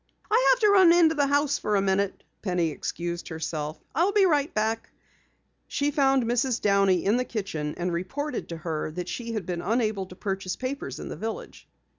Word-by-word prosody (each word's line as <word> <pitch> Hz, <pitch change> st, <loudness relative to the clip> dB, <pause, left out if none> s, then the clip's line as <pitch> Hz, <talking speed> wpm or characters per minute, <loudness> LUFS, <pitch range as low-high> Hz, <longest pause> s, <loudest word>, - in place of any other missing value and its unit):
"I 480 Hz, +3 st, +4 dB
have -, -, +5 dB
to 425 Hz, -, +5 dB
run 380 Hz, -4 st, +7 dB
into 335 Hz, -2 st, +5 dB
the 290 Hz, -3 st, +2 dB
house 285 Hz, 0 st, +1 dB
a 210 Hz, -1 st, +2 dB
minute," 195 Hz, 0 st, 0 dB, 0.2 s
Penny 180 Hz, -5 st, 0 dB
excused 170 Hz, +3 st, -4 dB
herself. 160 Hz, -2 st, -4 dB
"I'll 355 Hz, +5 st, +2 dB
be 405 Hz, -1 st, +4 dB
right 295 Hz, -4 st, +2 dB
back." 220 Hz, +1 st, -1 dB, 0.8 s
She 285 Hz, +1 st, 0 dB
found 270 Hz, -3 st, +3 dB
Mrs. 240 Hz, +1 st, +1 dB
Downey 195 Hz, -3 st, +3 dB
in 210 Hz, +5 st, +3 dB
the 250 Hz, -, +1 dB
kitchen 175 Hz, -11 st, -4 dB
and 175 Hz, 0 st, -2 dB
reported 265 Hz, -, -3 dB
to 165 Hz, -, -5 dB
her 160 Hz, -1 st, -3 dB
that 180 Hz, +1 st, -5 dB
she 235 Hz, +2 st, -4 dB
had 215 Hz, -5 st, -3 dB
been 175 Hz, -1 st, -3 dB
unable 215 Hz, -3 st, 0 dB
to 180 Hz, -, -12 dB
purchase 190 Hz, -1 st, -3 dB
papers 255 Hz, -, -5 dB
in -, -, -6 dB
the -, -, -5 dB
village. 220 Hz, +5 st, -6 dB
215 Hz, 190 wpm, -26 LUFS, 180-280 Hz, 0.8 s, run